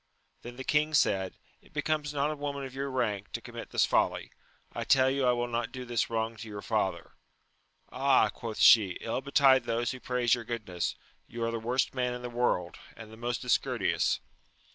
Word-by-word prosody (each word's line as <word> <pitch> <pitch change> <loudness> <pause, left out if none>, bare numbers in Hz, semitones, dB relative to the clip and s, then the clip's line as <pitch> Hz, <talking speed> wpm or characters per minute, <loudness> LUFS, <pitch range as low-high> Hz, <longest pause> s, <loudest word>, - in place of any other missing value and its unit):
Then 120 +1 -9
the 130 - -6
king 150 +2 +1
said, 95 -8 +1 0.2
It - - -23
becomes 150 0 -1
not 145 +1 0
a - - -3
woman 140 -1 -4
of 130 - -9
your 140 +1 -3
rank 105 -6 -2
to - - -2
commit 115 0 -9
this - - +3
folly: - - 0 0.4
I - - -3
tell 130 -1 +4
you 135 -1 +1
I - - +5
will 120 0 -1
not 120 -1 -2
do 130 -1 -7
this 120 -2 -1
wrong 115 0 -2
to 110 - -8
your 105 -1 -7
father. - - -1 0.8
Ah, 135 +1 +3
quoth 115 -3 -7
she, 100 -6 +6
ill 115 - -2
betide 135 -2 +4
those 115 +1 0
who 130 - -7
praise 125 -2 +1
your 120 -2 0
goodness! 105 -7 -3 0.3
you 120 0 -5
are 115 - 0
the 115 - -3
worst 125 +4 0
man 125 -1 -1
in 125 - -8
the 125 - -5
world, 105 -8 0 0.2
and 110 -1 -10
the - - -11
most 120 +2 -3
discourteous 125 - +1
120 Hz, 205 wpm, -29 LUFS, 115-130 Hz, 0.8 s, she